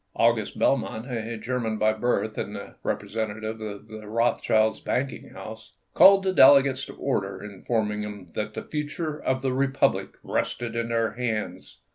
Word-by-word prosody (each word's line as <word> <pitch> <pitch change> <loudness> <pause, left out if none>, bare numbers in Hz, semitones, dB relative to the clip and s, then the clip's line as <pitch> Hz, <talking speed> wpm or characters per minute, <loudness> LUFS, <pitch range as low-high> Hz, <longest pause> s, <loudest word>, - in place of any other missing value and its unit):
August 115 -2 +2
Belmont, 120 -4 +1
a 115 -1 -3
German 115 -1 -2
by 110 0 +3
birth 110 -1 0
and - - -4
the - - -8
representative 110 0 -3
of 105 -1 -7
the 110 -1 -9
Rothschilds' 110 -1 +2
banking 130 0 -2
house, 110 +1 -10 0.2
called 195 0 +8
the 190 -1 +1
delegates 140 -3 +6
to - - -10
order, 100 -7 -2
informing 105 +1 -2
them 105 -2 -6
that 105 0 -4
the - - -4
future 150 +1 -4
of 130 0 -1
the 130 -1 +1
Republic 135 +1 +1
rested 120 -1 -2
in 115 0 -1
their 115 -1 +1
hands. 110 -3 -4
115 Hz, 155 wpm, -26 LUFS, 110-130 Hz, 0.2 s, called